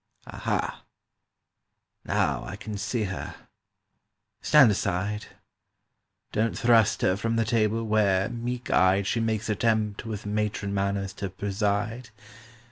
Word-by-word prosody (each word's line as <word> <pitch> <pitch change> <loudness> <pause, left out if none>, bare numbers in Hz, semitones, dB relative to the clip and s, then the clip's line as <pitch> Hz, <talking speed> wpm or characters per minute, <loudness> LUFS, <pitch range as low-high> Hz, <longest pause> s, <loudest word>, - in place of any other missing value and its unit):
"Aha—now - - -5
I - - -6
can 105 0 -7
see 105 +3 -2
her! 95 -2 -5 1.1
Stand 140 -7 +6
aside: 100 +2 -2 1.0
Don't 110 +2 0
thrust 115 -4 +3
her 90 - +3
from 115 +3 -1
the 115 0 +1
table 115 0 +1
Where, 105 -3 +2
meek 120 +1 -4
eyed, 95 +1 +4
She 115 +4 0
makes 110 -1 -1
attempt 110 -1 0
with 110 -3 -6
matron 105 -1 -2
manners 100 0 -1
to 100 0 -4
preside. 105 +5 -2
105 Hz, 115 wpm, -26 LUFS, 100-115 Hz, 1.1 s, Stand